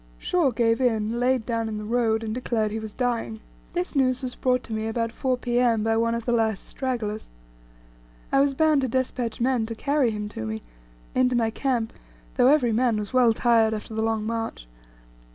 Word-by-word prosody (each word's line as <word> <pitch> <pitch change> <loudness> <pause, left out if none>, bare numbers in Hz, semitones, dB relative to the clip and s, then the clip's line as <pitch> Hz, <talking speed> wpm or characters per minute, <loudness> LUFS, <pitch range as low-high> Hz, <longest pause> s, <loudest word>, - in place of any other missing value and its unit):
Shaw 345 -6 +1
gave 230 0 +1
in, 225 -2 +1
laid 250 -2 +1
down 230 -2 -1
in 215 - -4
the 210 - -5
road, 225 -1 +1
and 215 -1 -3
declared 225 -3 -1
he 220 - -3
was 220 -1 -7
dying. 235 -2 -2 0.3
This 355 -2 -2
news 255 -1 +2
was 250 -1 -3
brought 250 -1 0
to 225 - -7
me 220 0 -2
about 230 0 -1
4 260 0 -1
P.M. 240 -3 +1
by 225 0 +1
one 230 +1 +1
of 235 -1 -4
the 240 - 0
last 220 -4 0
stragglers. 230 -5 -3 1.0
I 275 - +4
was 275 0 +2
bound 310 -1 +3
to 260 - 0
despatch 245 -2 -2
men 240 -2 +1
to 230 - -5
carry 280 +1 +1
him 210 -1 -4
to 110 - -6
me, 110 0 -5 0.5
into 255 -1 +2
my 225 -2 +1
camp, 235 -2 -1 0.4
though 250 -1 +4
every 270 -4 +4
man 235 -1 +2
was 210 +3 -4
well 250 -2 +5
tired 225 -1 +3
after 215 +1 -7
the 220 - -1
long 220 -1 0
march. 225 - -4
230 Hz, 205 wpm, -25 LUFS, 220-255 Hz, 1.0 s, well